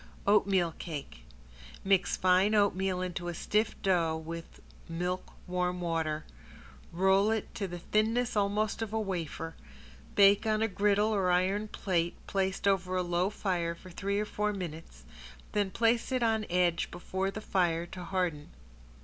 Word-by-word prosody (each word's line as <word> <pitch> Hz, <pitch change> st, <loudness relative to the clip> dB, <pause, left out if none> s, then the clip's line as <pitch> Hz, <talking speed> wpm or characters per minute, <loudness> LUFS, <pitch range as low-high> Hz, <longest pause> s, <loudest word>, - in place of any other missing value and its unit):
~OATMEAL 195 Hz, -4 st, +3 dB
CAKE~ 150 Hz, -, -6 dB, 0.6 s
Mix 195 Hz, -1 st, +2 dB
fine 185 Hz, +3 st, +4 dB
oatmeal 190 Hz, -2 st, +2 dB
into 175 Hz, -1 st, -4 dB
a 175 Hz, -, -3 dB
stiff 210 Hz, +6 st, 0 dB
dough 170 Hz, -4 st, +2 dB
with 165 Hz, +1 st, -8 dB, 0.3 s
milk 180 Hz, +2 st, -3 dB
warm 180 Hz, 0 st, -1 dB
water, 160 Hz, -3 st, -1 dB, 0.7 s
roll 190 Hz, +4 st, +3 dB
it 220 Hz, -2 st, -2 dB
to 200 Hz, -, -3 dB
the 175 Hz, -1 st, -6 dB
thinness 220 Hz, +6 st, +1 dB
almost 210 Hz, +2 st, +1 dB
of 220 Hz, -1 st, -3 dB
a 220 Hz, -, +1 dB
wafer, 170 Hz, -5 st, -3 dB, 0.6 s
bake 200 Hz, +2 st, +6 dB
on 215 Hz, 0 st, +2 dB
a -, -, +3 dB
griddle 205 Hz, +1 st, +2 dB
or 190 Hz, -3 st, +1 dB
iron 190 Hz, +4 st, +2 dB
plate 175 Hz, -5 st, -1 dB
placed 190 Hz, 0 st, -1 dB
over 185 Hz, -2 st, +1 dB
a 180 Hz, -, +1 dB
slow 175 Hz, +2 st, +1 dB
fire 175 Hz, -5 st, -1 dB
for 185 Hz, +2 st, -13 dB
three 200 Hz, +3 st, -1 dB
or 210 Hz, -, 0 dB
four 210 Hz, 0 st, -1 dB
minutes, 165 Hz, -, -7 dB, 0.5 s
then 205 Hz, -2 st, +1 dB
place 230 Hz, +5 st, +1 dB
it 255 Hz, -2 st, +1 dB
on 220 Hz, -2 st, +1 dB
edge 175 Hz, -1 st, +2 dB
before 190 Hz, +2 st, -3 dB
the 200 Hz, -, -5 dB
fire 175 Hz, -5 st, +1 dB
to 180 Hz, +1 st, -8 dB
harden. 175 Hz, -5 st, -2 dB
190 Hz, 155 wpm, -30 LUFS, 175-205 Hz, 0.7 s, bake